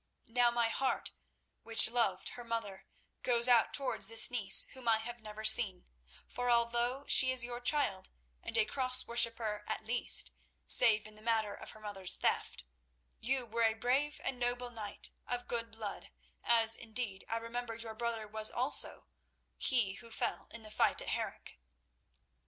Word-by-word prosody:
Now 240 Hz, +1 st, +2 dB
my 235 Hz, -1 st, 0 dB
heart, 260 Hz, +3 st, -2 dB, 0.5 s
which 225 Hz, 0 st, +6 dB
loved 225 Hz, -6 st, 0 dB
her 245 Hz, -, -10 dB
mother, 210 Hz, -5 st, -5 dB, 0.3 s
goes 235 Hz, -1 st, +3 dB
out 240 Hz, -2 st, +4 dB
towards 275 Hz, -2 st, -3 dB
this 225 Hz, +2 st, +6 dB
niece 230 Hz, -6 st, +4 dB
whom 260 Hz, -2 st, -11 dB
I 225 Hz, -, +4 dB
have 235 Hz, +1 st, -8 dB
never 215 Hz, 0 st, -10 dB
seen, 215 Hz, -4 st, +4 dB, 0.4 s
for 245 Hz, 0 st, -3 dB
although 240 Hz, +3 st, +1 dB
she 260 Hz, -1 st, +5 dB
is 255 Hz, -2 st, +1 dB
your 240 Hz, 0 st, -6 dB
child 245 Hz, -8 st, 0 dB, 0.3 s
and -, -, -4 dB
a -, -, +3 dB
Cross 255 Hz, 0 st, +1 dB
worshipper 230 Hz, -3 st, 0 dB
at 220 Hz, -, -4 dB
least—save 225 Hz, -1 st, +2 dB
in 215 Hz, -, -12 dB
the 215 Hz, -, -16 dB
matter 220 Hz, -2 st, 0 dB
of -, -, -11 dB
her 215 Hz, -, -12 dB
mother's 195 Hz, -3 st, 0 dB
theft—you -, -, -4 dB
were 230 Hz, +1 st, -4 dB
a 220 Hz, -1 st, +1 dB
brave 275 Hz, +6 st, -1 dB
and 250 Hz, -, -3 dB
noble 245 Hz, 0 st, -3 dB
knight, 215 Hz, -3 st, -6 dB, 0.2 s
of 245 Hz, 0 st, -4 dB
good 230 Hz, -1 st, -4 dB
blood, 220 Hz, -2 st, -7 dB, 0.3 s
as, 225 Hz, -1 st, +4 dB
indeed, 220 Hz, -4 st, -4 dB
I 230 Hz, -, -1 dB
remember 230 Hz, 0 st, -6 dB
your 225 Hz, -1 st, -9 dB
brother 225 Hz, -1 st, -4 dB
was 215 Hz, +1 st, +5 dB
also, 255 Hz, +4 st, +1 dB, 0.5 s
he 235 Hz, -8 st, +1 dB
who 230 Hz, +3 st, -11 dB
fell 225 Hz, -, -3 dB
in 230 Hz, -, -10 dB
the 215 Hz, -, -11 dB
fight -, -, +1 dB
at -, -, -6 dB
Harenc. -, -, -6 dB
230 Hz, 165 wpm, -33 LUFS, 215-245 Hz, 0.5 s, which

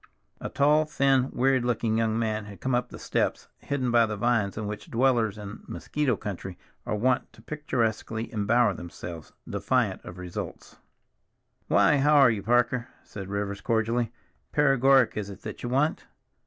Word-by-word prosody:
A -, -, -5 dB
tall, 150 Hz, +2 st, +3 dB
thin, 135 Hz, -3 st, +2 dB
wearied 130 Hz, 0 st, +2 dB
looking 115 Hz, -2 st, 0 dB
young 110 Hz, -1 st, +1 dB
man 110 Hz, -2 st, -1 dB
had 100 Hz, -3 st, -11 dB
come 130 Hz, +5 st, -1 dB
up 125 Hz, 0 st, 0 dB
the -, -, -9 dB
steps, -, -, -1 dB
hidden 130 Hz, -4 st, -2 dB
by 115 Hz, -1 st, +5 dB
the 105 Hz, -1 st, -4 dB
vines 105 Hz, -3 st, +1 dB
in 110 Hz, -, -3 dB
which 105 Hz, 0 st, -6 dB
dwellers 115 Hz, -4 st, +2 dB
in 105 Hz, 0 st, -8 dB
a -, -, -9 dB
mosquito 145 Hz, -5 st, -1 dB
country 95 Hz, -3 st, -6 dB, 0.3 s
are -, -, 0 dB
wont 125 Hz, +4 st, +1 dB
to -, -, -17 dB
picturesquely 115 Hz, -6 st, -2 dB
embower 110 Hz, +1 st, +3 dB
themselves, 85 Hz, -2 st, -8 dB, 0.2 s
defiant -, -, 0 dB
of 90 Hz, -, -9 dB
results. 90 Hz, -1 st, -7 dB, 0.9 s
"Why, 150 Hz, -, +4 dB
how 150 Hz, +2 st, +4 dB
are 135 Hz, -4 st, +7 dB
you, 105 Hz, -3 st, -2 dB
Parker?" 120 Hz, +2 st, +2 dB, 0.2 s
said 100 Hz, -2 st, -8 dB
Rivers 100 Hz, 0 st, -3 dB
cordially. 115 Hz, +1 st, 0 dB, 0.4 s
"Paregoric 135 Hz, -3 st, +4 dB
is 105 Hz, -1 st, -3 dB
it 100 Hz, -, -11 dB
that -, -, -7 dB
you 120 Hz, -, -3 dB
want? 140 Hz, +5 st, 0 dB
115 Hz, 170 wpm, -27 LUFS, 105-130 Hz, 0.9 s, are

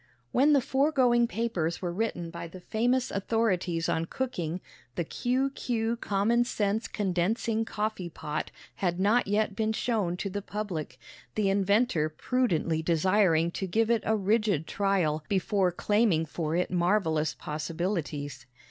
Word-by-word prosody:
WHEN 290 Hz, +4 st, +4 dB
the 280 Hz, -, +5 dB
foregoing 260 Hz, -3 st, +3 dB
papers 200 Hz, -9 st, -1 dB
were 175 Hz, -2 st, -3 dB
written 175 Hz, -5 st, -2 dB
by 170 Hz, 0 st, -6 dB
the 185 Hz, +3 st, -11 dB
famous 245 Hz, +7 st, 0 dB
authorities 190 Hz, -5 st, 0 dB
on 160 Hz, 0 st, 0 dB
cooking, 180 Hz, -7 st, -3 dB, 0.4 s
the 170 Hz, -, 0 dB
Q. 255 Hz, -, 0 dB
Q. 230 Hz, -4 st, -1 dB
common 230 Hz, +2 st, +1 dB
sense 215 Hz, -1 st, -1 dB
condensing 215 Hz, +4 st, 0 dB
coffee 210 Hz, -5 st, -3 dB
pot 155 Hz, -2 st, -4 dB, 0.3 s
had 175 Hz, -2 st, -1 dB
not 210 Hz, +5 st, +3 dB
yet 210 Hz, 0 st, +1 dB
been 220 Hz, 0 st, 0 dB
shown 210 Hz, -7 st, 0 dB
to 200 Hz, -, -3 dB
the 205 Hz, +1 st, -3 dB
public, 200 Hz, -6 st, -5 dB, 0.4 s
the 205 Hz, -2 st, +2 dB
inventor 200 Hz, -4 st, +2 dB
prudently 165 Hz, -4 st, 0 dB
desiring 170 Hz, 0 st, +3 dB
to 190 Hz, -, -3 dB
give 225 Hz, +5 st, +1 dB
it 230 Hz, -2 st, +3 dB
a 220 Hz, -, +2 dB
rigid 205 Hz, -5 st, +1 dB
trial 180 Hz, -7 st, 0 dB
before 190 Hz, -1 st, +1 dB
claiming 205 Hz, -3 st, +2 dB
for 160 Hz, 0 st, -3 dB
it 180 Hz, +1 st, 0 dB
marvelous 175 Hz, -4 st, +1 dB
possibilities. 150 Hz, -, -4 dB
195 Hz, 140 wpm, -28 LUFS, 170-225 Hz, 0.4 s, the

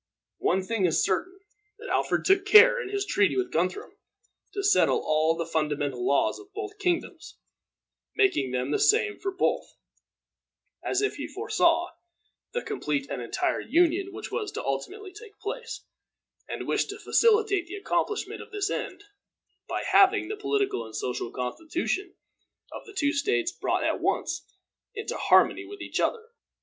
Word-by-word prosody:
One 190 Hz, +2 st, +1 dB
thing 205 Hz, -1 st, 0 dB
is 160 Hz, -, +2 dB
certain, 365 Hz, -, -2 dB, 0.4 s
that 475 Hz, +3 st, -9 dB
Alfred -, -, 0 dB
took 385 Hz, 0 st, +4 dB
care, 455 Hz, +4 st, +7 dB
in 425 Hz, -, -6 dB
his 400 Hz, 0 st, -2 dB
treaty 405 Hz, -1 st, +2 dB
with 380 Hz, -, -1 dB
Guthrum, 180 Hz, +3 st, -2 dB, 0.5 s
to 400 Hz, 0 st, -4 dB
settle 405 Hz, -, +3 dB
all 155 Hz, +1 st, +2 dB
the 170 Hz, -, -2 dB
fundamental 145 Hz, -5 st, -1 dB
laws 140 Hz, -, +2 dB
of 405 Hz, 0 st, -15 dB
both 415 Hz, 0 st, -6 dB
kingdoms, 355 Hz, -4 st, -2 dB, 0.8 s
making 390 Hz, -, +2 dB
them 125 Hz, +2 st, -2 dB
the -, -, +1 dB
same 420 Hz, -1 st, +3 dB
for 390 Hz, -, -2 dB
both, 375 Hz, -, -1 dB, 1.1 s
as 395 Hz, -, 0 dB
if 415 Hz, -, -1 dB
he -, -, -4 dB
foresaw 340 Hz, +1 st, +1 dB, 0.6 s
the 485 Hz, 0 st, -3 dB
complete 150 Hz, -, -3 dB
and -, -, -3 dB
entire 120 Hz, -, -1 dB
union 350 Hz, +6 st, +2 dB
which -, -, -8 dB
was 425 Hz, -4 st, -3 dB
ultimately 135 Hz, -, -4 dB
to 405 Hz, -, -11 dB
take 420 Hz, -2 st, -15 dB
place, -, -, -6 dB, 0.6 s
and -, -, -5 dB
wished -, -, 0 dB
to 410 Hz, -, -6 dB
facilitate 430 Hz, -5 st, +3 dB
the 370 Hz, -, -7 dB
accomplishment 415 Hz, +1 st, -2 dB
of -, -, -11 dB
this 410 Hz, -1 st, -2 dB
end 375 Hz, +2 st, -4 dB, 0.7 s
by -, -, -2 dB
having 395 Hz, +1 st, +4 dB
the 430 Hz, -, -2 dB
political 410 Hz, -, -1 dB
and 110 Hz, -1 st, -10 dB
social 125 Hz, -2 st, -3 dB
constitution 330 Hz, -, -3 dB, 0.6 s
of -, -, -9 dB
the 420 Hz, -, -11 dB
two 290 Hz, -3 st, +2 dB
states 350 Hz, +4 st, +1 dB
brought -, -, -1 dB
at -, -, 0 dB
once -, -, -1 dB, 0.5 s
into 430 Hz, +1 st, -4 dB
harmony -, -, +4 dB
with 405 Hz, 0 st, -10 dB
each -, -, -4 dB
other. 455 Hz, 0 st, -1 dB
385 Hz, 160 wpm, -27 LUFS, -, 1.1 s, care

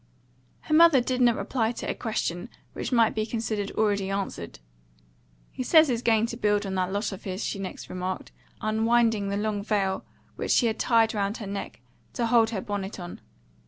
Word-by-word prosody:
Her 310 Hz, -, -3 dB
mother 330 Hz, -3 st, +7 dB
did 255 Hz, +1 st, -1 dB
not 240 Hz, -2 st, +5 dB
reply 230 Hz, -3 st, -1 dB
to -, -, -6 dB
a -, -, 0 dB
question 215 Hz, -3 st, -3 dB, 0.2 s
which -, -, -4 dB
might 230 Hz, -3 st, +4 dB
be 215 Hz, -, -1 dB
considered 215 Hz, -2 st, -2 dB
already 205 Hz, -3 st, +1 dB
answered. 195 Hz, -, -4 dB, 0.9 s
"He -, -, -6 dB
says 315 Hz, +4 st, +5 dB
he's 240 Hz, -2 st, 0 dB
going 225 Hz, -2 st, +3 dB
to 235 Hz, 0 st, -5 dB
build 210 Hz, -2 st, +1 dB
on 195 Hz, -, -3 dB
that 185 Hz, 0 st, -1 dB
lot 205 Hz, +3 st, -1 dB
of 195 Hz, -, -8 dB
his," 190 Hz, +1 st, -4 dB
she 200 Hz, -, -3 dB
next 190 Hz, -1 st, -6 dB
remarked, 185 Hz, +1 st, -4 dB, 0.3 s
unwinding 220 Hz, -1 st, +2 dB
the 200 Hz, -, -1 dB
long 210 Hz, -1 st, -2 dB
veil 195 Hz, -3 st, 0 dB, 0.3 s
which -, -, -4 dB
she 245 Hz, -, +4 dB
had 225 Hz, -1 st, 0 dB
tied 225 Hz, -2 st, +3 dB
round 205 Hz, 0 st, -1 dB
her 215 Hz, -, -7 dB
neck 195 Hz, -, -6 dB, 0.3 s
to 235 Hz, -, -1 dB
hold 230 Hz, -1 st, +4 dB
her 215 Hz, -4 st, -3 dB
bonnet 200 Hz, 0 st, -4 dB
on. 175 Hz, -1 st, -8 dB
215 Hz, 195 wpm, -26 LUFS, 195-230 Hz, 0.9 s, mother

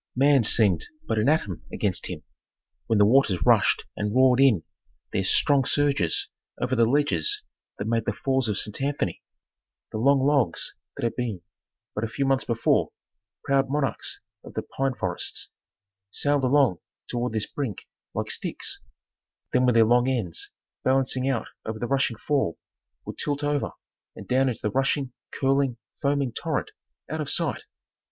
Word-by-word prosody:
Man 140 Hz, 0 st, +5 dB
seemed 105 Hz, -6 st, +4 dB, 0.2 s
but 110 Hz, -1 st, +1 dB
an 110 Hz, +6 st, +3 dB
atom 105 Hz, -, 0 dB
against -, -, -1 dB
Him, -, -, -6 dB, 0.6 s
when 110 Hz, -, +2 dB
the 105 Hz, -, +6 dB
waters 105 Hz, -, +3 dB
rushed -, -, +4 dB
and 105 Hz, +1 st, -2 dB
roared 130 Hz, -1 st, +5 dB
in 125 Hz, -12 st, +5 dB, 0.5 s
their 95 Hz, -, +1 dB
strong 135 Hz, +8 st, +4 dB
surges 140 Hz, -, +2 dB, 0.3 s
over -, -, 0 dB
the 115 Hz, -1 st, +4 dB
ledges 150 Hz, -, +1 dB, 0.3 s
that 100 Hz, -, -4 dB
made 115 Hz, 0 st, 0 dB
the -, -, +1 dB
Falls 130 Hz, -2 st, 0 dB
of 105 Hz, -, 0 dB
St. 105 Hz, +4 st, 0 dB
Anthony; 145 Hz, +1 st, -1 dB, 0.7 s
the 110 Hz, -, -3 dB
long 135 Hz, +2 st, +4 dB
logs 140 Hz, -4 st, +1 dB, 0.2 s
that -, -, -5 dB
had 115 Hz, -, 0 dB
been, 110 Hz, -8 st, -3 dB, 0.5 s
but 105 Hz, -, -3 dB
a -, -, 0 dB
few 135 Hz, +5 st, -2 dB
months 135 Hz, 0 st, +1 dB
before, 115 Hz, -1 st, +2 dB, 0.5 s
proud 135 Hz, -1 st, +2 dB
monarchs 145 Hz, -1 st, -2 dB, 0.2 s
of -, -, -12 dB
the -, -, -2 dB
pine 135 Hz, -1 st, -2 dB
forests, -, -, -3 dB, 0.6 s
sailed 145 Hz, +5 st, 0 dB
along 130 Hz, -, +3 dB, 0.3 s
toward 120 Hz, -1 st, -2 dB
this 110 Hz, -1 st, 0 dB
brink 130 Hz, -9 st, -5 dB, 0.3 s
like -, -, -2 dB
sticks, -, -, -4 dB, 0.7 s
then 125 Hz, -, +4 dB
with 125 Hz, -, +3 dB
their 115 Hz, -1 st, +6 dB
long 120 Hz, +3 st, +3 dB
ends 110 Hz, -, -2 dB, 0.3 s
balancing 130 Hz, 0 st, +1 dB
out 125 Hz, -4 st, -1 dB, 0.2 s
over 110 Hz, 0 st, -4 dB
the 120 Hz, -, -3 dB
rushing 135 Hz, -3 st, +1 dB
fall 135 Hz, -, 0 dB, 0.5 s
would -, -, -7 dB
tilt 145 Hz, 0 st, -1 dB
over 145 Hz, -1 st, 0 dB, 0.4 s
and -, -, -10 dB
down 130 Hz, +1 st, +3 dB
into 120 Hz, -, -5 dB
the 105 Hz, -, 0 dB
rushing, 135 Hz, -1 st, 0 dB, 0.2 s
curling, 135 Hz, -2 st, +1 dB, 0.2 s
foaming 140 Hz, -3 st, +1 dB
torrent -, -, -2 dB, 0.4 s
out -, -, -3 dB
of -, -, -3 dB
sight. -, -, 0 dB
130 Hz, 160 wpm, -26 LUFS, 110-140 Hz, 0.7 s, the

